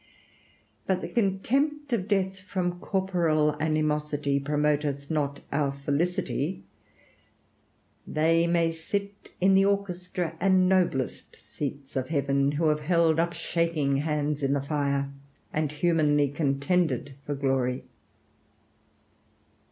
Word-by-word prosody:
But 185 -1 +1
the - - -4
contempt 270 +8 0
of 200 -4 0
death 190 -2 0
from 180 -1 -3
corporal 170 -6 +1
animosity 150 -2 0
promoteth 145 0 0
not 145 -2 -1
our 140 -1 +1
felicity. 150 - -1 1.4
They 165 +2 +2
may 170 -1 +2
sit 200 +5 -5
in 190 +1 +4
the 195 0 +5
orchestra 180 -4 -2
and 185 0 +4
noblest 175 -8 0
seats 140 -1 -6
of 130 -1 -1
heaven 140 -1 +1
who 155 +1 +2
have 150 0 +1
held 165 0 +2
up 170 +1 +1
shaking 165 -4 0
hands 150 0 -1
in 135 0 +1
the 140 - +1
fire, 140 -1 -1 0.4
and 155 -1 0
humanly 150 -2 +2
contended 140 -1 0
for 145 - -3
glory. 135 -2 0
155 Hz, 115 wpm, -27 LUFS, 140-180 Hz, 1.4 s, the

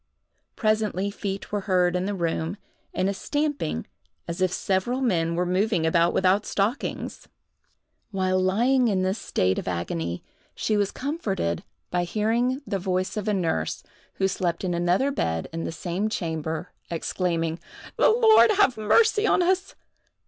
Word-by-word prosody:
Presently 215 -3 0
feet 200 -1 -5
were 205 - 0
heard 180 -1 +3
in 180 +1 0
the 205 - -2
room, 170 +1 -2 0.3
and 185 +1 0
a 200 - 0
stamping 290 +8 -2 0.4
as 170 +2 -4
if 185 -1 +3
several 195 +8 0
men 170 -10 +1
were 180 +1 +1
moving 185 -1 +1
about 170 +1 +3
without 190 +2 +3
stockings. 210 +7 -2 0.8
While 185 -2 +1
lying 240 +7 +3
in 190 -4 +1
this 190 +3 0
state 95 0 0
of - - -7
agony, 85 -1 -3 0.3
she 215 - 0
was 205 -1 +2
comforted 205 - -2 0.3
by 175 0 +1
hearing 235 +8 0
the 195 - -2
voice 185 0 -1
of 210 0 -3
a 210 - +2
nurse, 160 - -1 0.3
who 190 - +1
slept 175 -2 -2
in 180 -2 0
another 175 +11 +2
bed 80 - -1
in 165 0 -3
the - - -3
same 175 +5 -2
chamber, 160 -3 -3 0.2
exclaiming: 165 -1 -1 0.4
"The - - +5
Lord 445 -1 +6
have 390 - +3
mercy 420 - +3
upon 365 - +3
us!" 375 +2 0
190 Hz, 155 wpm, -25 LUFS, 170-220 Hz, 0.8 s, Lord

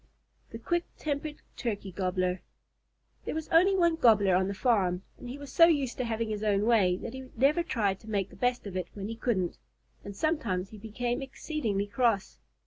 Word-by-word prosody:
THE - - -7
QUICK 345 +9 -1
TEMPERED 295 0 -3 0.2
TURKEY 205 -5 -3
GOBBLER 185 0 -1 0.8
There - - -3
was 315 0 -3
only 370 +4 +5
one 340 -2 +3
Gobbler 210 - +5
on 190 +1 +2
the 200 - -3
farm, 190 -6 +1 0.2
and 245 - -8
he 260 - -6
was 285 -2 -9
so 335 - +8
used 285 -7 +1
to 255 - -1
having 230 0 -1
his 210 -1 -3
own 205 -1 +2
way 200 -6 +4
that 225 - -7
he 260 0 -8
never 280 +7 +4
tried 205 - 0
to 220 - -13
make 200 -3 -1
the - - -13
best 245 -1 0
of 195 -2 -6
it 180 -2 -2
when 200 0 -5
he 225 - -4
couldn't, 210 -7 -1 0.4
and 200 -1 -8
sometimes 200 - -1
he 215 - -10
became 240 +4 -3
exceedingly 265 -7 -2
cross. 215 -2 0
225 Hz, 200 wpm, -29 LUFS, 195-270 Hz, 0.8 s, so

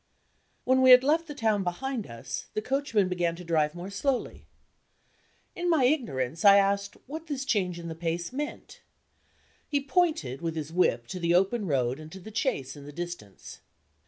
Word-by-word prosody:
When 260 0 +3
we 260 - +6
had 250 0 +9
left 320 +4 +2
the 295 - -7
town 220 -6 +1
behind 230 +6 -3
us, 120 +2 -6
the 215 - 0
coachman 260 -7 +1
began 175 -2 -1
to 180 - -10
drive 160 -2 +1
more 180 +3 -7
slowly. 260 +5 -2 1.1
In 350 0 -1
my 320 -6 +3
ignorance, 165 - 0
I 200 -1 +9
asked 200 0 +1
what 315 +4 -7
this 275 -3 -3
change 185 -9 0
in 170 -1 -7
the 165 - -4
pace 170 +3 -3
meant. 295 +2 -6 0.9
He 285 - +1
pointed 280 - 0
with 165 -1 -3
his 155 0 -5
whip 170 -9 +2
to 185 - -5
the 170 0 +2
open 195 +3 +2
road 130 -2 0
and 155 0 -10
to 190 - -8
the 215 +4 -11
chaise 140 - -1
in 145 -1 -11
the - - -8
distance. 170 - -8
190 Hz, 185 wpm, -28 LUFS, 165-260 Hz, 1.1 s, had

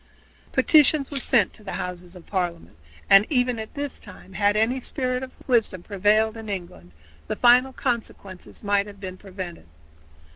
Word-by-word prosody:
Petitions 300 -2 +4
were 280 - -2
sent 235 -6 +2
to 215 - -13
the 195 - -6
Houses 180 0 -6
of 180 - -13
Parliament, 175 - -3 0.3
and 195 +1 +8
even 250 -4 +1
at 220 - -8
this 285 -1 -4
time 190 -2 -14
had 205 +1 +2
any 235 +4 +1
spirit 255 -1 -2
of 260 - -6 0.2
wisdom 225 -8 +1
prevailed 215 +3 +2
in 225 -1 -8
England 170 - -7 0.4
the - - -2
final 250 +2 +5
consequences 225 -9 -5
might 200 0 +1
have 200 -1 -12
been 185 -2 -6
prevented. 185 - -8
210 Hz, 160 wpm, -24 LUFS, 185-250 Hz, 0.4 s, and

